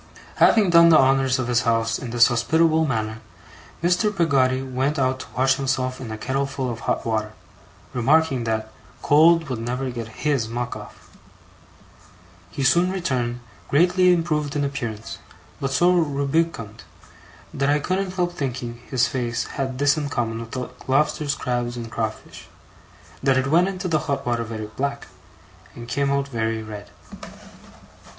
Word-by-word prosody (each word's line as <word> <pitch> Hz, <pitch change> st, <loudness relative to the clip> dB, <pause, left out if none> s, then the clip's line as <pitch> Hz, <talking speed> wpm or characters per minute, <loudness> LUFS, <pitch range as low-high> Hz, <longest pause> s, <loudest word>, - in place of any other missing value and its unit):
Having 205 Hz, -5 st, +5 dB
done 170 Hz, 0 st, +7 dB
the 160 Hz, -, +7 dB
honours 135 Hz, -1 st, +3 dB
of 130 Hz, -2 st, -2 dB
his 120 Hz, -1 st, +2 dB
house 115 Hz, -1 st, 0 dB
in 125 Hz, -, -6 dB
this 120 Hz, 0 st, +5 dB
hospitable 160 Hz, +6 st, +2 dB
manner, 110 Hz, -3 st, -2 dB, 0.6 s
Mr. 180 Hz, +5 st, +2 dB
Peggotty 135 Hz, -9 st, +1 dB
went 135 Hz, +3 st, -1 dB
out 130 Hz, -1 st, 0 dB
to -, -, -7 dB
wash 130 Hz, +1 st, +3 dB
himself 130 Hz, -1 st, -2 dB
in 120 Hz, -, -6 dB
a 110 Hz, -, -5 dB
kettleful 135 Hz, +1 st, -2 dB
of 115 Hz, -, -6 dB
hot -, -, -2 dB
water, 110 Hz, -1 st, -2 dB, 0.6 s
remarking 135 Hz, +1 st, +2 dB
that 110 Hz, -1 st, -2 dB, 0.3 s
'cold 160 Hz, +2 st, +5 dB
would 125 Hz, -4 st, -4 dB
never 125 Hz, +3 st, -3 dB
get 120 Hz, -2 st, -6 dB, 0.2 s
his 140 Hz, -7 st, +1 dB
muck 120 Hz, +1 st, -3 dB
off'. -, -, -12 dB, 1.4 s
He 135 Hz, -, -4 dB
soon 170 Hz, +8 st, +4 dB
returned, 125 Hz, -10 st, -2 dB, 0.3 s
greatly 180 Hz, +4 st, +4 dB
improved 155 Hz, -4 st, 0 dB
in 145 Hz, -, 0 dB
appearance; 110 Hz, -8 st, -5 dB, 0.4 s
but 135 Hz, -, -2 dB
so 175 Hz, +7 st, +4 dB
rubicund, 140 Hz, -, -1 dB, 0.7 s
that 140 Hz, 0 st, 0 dB
I 145 Hz, -, +4 dB
couldn't 185 Hz, +4 st, -2 dB
help 175 Hz, -1 st, 0 dB
thinking 125 Hz, -5 st, -4 dB
his 125 Hz, -3 st, +2 dB
face 120 Hz, -2 st, -2 dB
had 130 Hz, -2 st, -4 dB
this 145 Hz, +2 st, +3 dB
in 145 Hz, -2 st, -2 dB
common 115 Hz, -4 st, -2 dB
with 115 Hz, 0 st, -8 dB
the 130 Hz, -2 st, -4 dB, 0.2 s
lobsters, 150 Hz, +2 st, +1 dB
crabs, 120 Hz, -2 st, -2 dB
and 115 Hz, -1 st, -7 dB
crawfish, 110 Hz, -1 st, -5 dB, 0.7 s
that 135 Hz, -1 st, +3 dB
it 130 Hz, -, +1 dB
went 175 Hz, +3 st, +4 dB
into 190 Hz, -1 st, -4 dB
the 160 Hz, -3 st, +1 dB
hot 140 Hz, -2 st, -3 dB
water 120 Hz, -1 st, 0 dB
very 110 Hz, -1 st, -6 dB
black, 140 Hz, +6 st, -4 dB, 0.7 s
and 120 Hz, 0 st, -9 dB
came 140 Hz, +4 st, 0 dB
out 140 Hz, 0 st, 0 dB
very 115 Hz, -3 st, -2 dB
red. 105 Hz, -2 st, -9 dB
130 Hz, 160 wpm, -23 LUFS, 120-150 Hz, 1.4 s, done